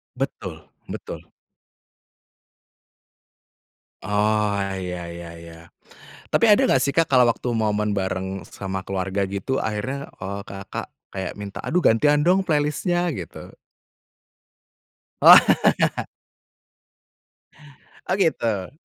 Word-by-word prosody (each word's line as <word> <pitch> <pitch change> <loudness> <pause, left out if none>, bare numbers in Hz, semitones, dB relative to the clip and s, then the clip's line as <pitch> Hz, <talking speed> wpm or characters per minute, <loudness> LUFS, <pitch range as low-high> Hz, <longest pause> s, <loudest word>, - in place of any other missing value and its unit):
Betul - - -5 0.2
betul. - - -8 2.7
Oh, 105 0 +1 0.2
ya 90 -1 -5
ya 85 -1 -9
ya. 85 0 -13 0.6
Tapi - - +3
ada 210 -1 +6
nggak 135 - +3
sih, 140 +2 -1
Kak, 165 -2 +2
kalau 125 -2 +6
waktu 120 +1 -1
momen 105 -2 0
bareng 95 -1 -3
sama 95 -1 -5
keluarga 95 +1 -2
gitu, 100 +7 -2
akhirnya, 130 +6 -3
eee, 100 +2 -6
Kakak 100 0 -7 0.2
kayak 95 -2 -5
minta, 100 -1 -7
"Aduh, 180 +1 -1
gantian 145 +6 +4
dong 180 +3 +4
playlist-nya," 165 +3 0
gitu? 90 - -8 1.7
Wah. - - +9 2.6
Oh, 185 - +2
gitu. 115 - 0
105 Hz, 100 wpm, -23 LUFS, 95-140 Hz, 2.7 s, Wah